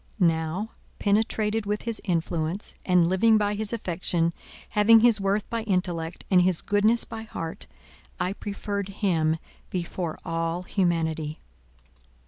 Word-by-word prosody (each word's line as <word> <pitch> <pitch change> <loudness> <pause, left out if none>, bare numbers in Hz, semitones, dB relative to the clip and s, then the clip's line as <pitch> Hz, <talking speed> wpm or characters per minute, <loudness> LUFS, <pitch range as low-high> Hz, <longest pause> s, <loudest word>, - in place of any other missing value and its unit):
Now, 170 +4 +1 0.3
penetrated 215 +1 +1
with 210 +1 -1
his 230 -1 -3
influence, 170 0 -1
and 180 -2 +4
living 215 +5 +4
by 205 -1 +1
his 210 0 -1
affection, 175 -5 0 0.4
having 220 +2 +6
his 230 -3 +4
worth 195 +2 0
by 230 -1 -1
intellect, 180 -5 -2
and 180 -1 +6
his 180 -2 +1
goodness 215 +3 +3
by 225 -1 -7
heart—I 180 -1 -6
preferred 200 -1 -4 0.2
him 160 -4 +2 0.3
before 175 -2 -3
all 165 +1 -2
humanity. 160 -5 0
190 Hz, 120 wpm, -26 LUFS, 165-210 Hz, 0.4 s, having